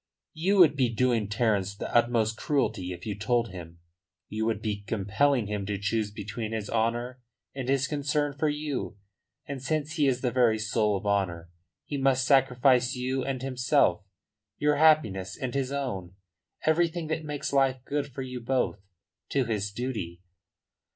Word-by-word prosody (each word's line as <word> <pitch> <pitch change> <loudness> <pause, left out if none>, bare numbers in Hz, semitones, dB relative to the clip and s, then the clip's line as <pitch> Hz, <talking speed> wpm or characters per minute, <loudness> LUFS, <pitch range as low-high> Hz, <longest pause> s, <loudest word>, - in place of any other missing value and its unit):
"You 190 +6 +1
would 160 -6 +7
be 130 -4 +2
doing 115 -2 +1
Terence 105 -4 0
the - - -6
utmost 115 -2 +3
cruelty 110 -10 -1
if 90 -1 -8
you 105 - -2
told 115 +3 0
him. 85 -2 -9 0.5
You 110 +1 -2
would 110 -3 0
be 105 -2 -3
compelling 115 +5 +1
him 105 -1 -3
to 105 -1 -1
choose 105 +2 -1
between 105 +2 -5
his 110 -2 -4
honour 120 +3 -1 0.3
and 130 -2 -4
his 135 0 +2
concern 145 0 0
for 150 +2 0
you. 145 -11 -3 0.5
And 140 -2 -6
since 155 +3 -2
he 145 -2 +3
is 130 -2 +1
the 125 - 0
very 120 -3 +3
soul 105 -1 +1
of 100 - -9
honour, 90 -5 -1 0.3
he 145 - -3
must 135 -1 +2
sacrifice 130 -1 +4
you 130 +1 -1
and 130 -2 -3
himself, 130 - +2 0.5
your 150 0 +2
happiness 110 - +3
and 130 -2 -4
his 135 -1 -1
own, 100 -11 -4 0.5
everything 165 +1 +2
that 160 0 -2
makes 150 -2 -4
life 130 -2 +2
good 145 0 -1
for 135 +1 -5
you 125 -1 -6
both, 120 -6 0 0.5
to 135 -2 +1
his 105 -3 -2
duty." 100 -7 -4
125 Hz, 165 wpm, -28 LUFS, 105-140 Hz, 0.5 s, would